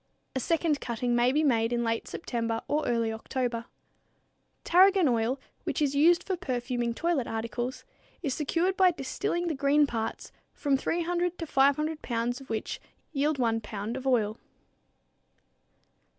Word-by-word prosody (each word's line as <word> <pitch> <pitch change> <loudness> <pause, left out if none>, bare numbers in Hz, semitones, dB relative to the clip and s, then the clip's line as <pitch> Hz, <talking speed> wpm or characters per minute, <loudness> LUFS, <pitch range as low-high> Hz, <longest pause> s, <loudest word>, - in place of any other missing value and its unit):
A - - +1
second 320 +1 +1
cutting 240 0 -1
may 240 +1 +4
be 300 +3 +2
made 230 -5 +2
in 240 0 0
late 230 0 -1
September 230 -6 -3
or 300 +1 0
early 230 -2 +1
October. 235 +1 -3 1.0
Tarragon 375 0 +5
oil, 240 +2 +1 0.2
which - - -2
is 285 -2 +1
used 335 +5 +5
for 380 - -1
perfuming 245 -7 -2
toilet 325 -6 0
articles, 235 +3 -4 0.4
is 280 -5 0
secured 335 +6 0
by 375 -1 +6
distilling 345 +3 -2
the 335 - 0
green 285 +1 +3
parts, 225 -5 -4 0.2
from 285 -4 +1
300 345 +4 -1
to 330 - -4
500 300 +2 +2
pounds 240 +2 -2
of 270 - -14
which 220 -1 -3 0.3
yield 295 0 +1
one 225 -3 +1
pound 210 +1 -5
of 265 0 -4
oil. 220 -4 +1
265 Hz, 150 wpm, -28 LUFS, 235-315 Hz, 1.0 s, by